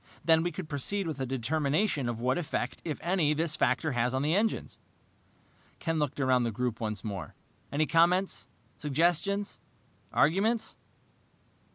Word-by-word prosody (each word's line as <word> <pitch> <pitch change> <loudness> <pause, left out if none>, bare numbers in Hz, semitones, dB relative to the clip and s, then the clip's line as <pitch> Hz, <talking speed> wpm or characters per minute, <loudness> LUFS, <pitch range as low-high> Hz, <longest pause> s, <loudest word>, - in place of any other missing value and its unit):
Then 160 -1 +5
we 175 +1 -1
could 185 -3 -6
proceed 155 +7 -1
with 155 -4 -4
a 130 - -2
determination 140 - 0
of 115 -1 -3
what 130 +6 +1
effect, 155 -3 -3
if 155 -3 -3
any, 170 -4 +2
this 160 0 0
factor 150 +3 +1
has 125 0 0
on 130 - 0
the 155 +2 +2
engines." 215 +4 0 1.0
Ken 165 -1 -1
looked 145 -1 -1
around 130 -2 +3
the 120 - +1
group 120 +1 -2
once 105 -3 -3
more. 100 -4 -5 0.4
"Any 150 +2 +2
comments, 175 +4 +2 0.3
suggestions, 175 +7 +1 0.5
arguments? 215 +9 +2
150 Hz, 150 wpm, -30 LUFS, 130-175 Hz, 1.0 s, Then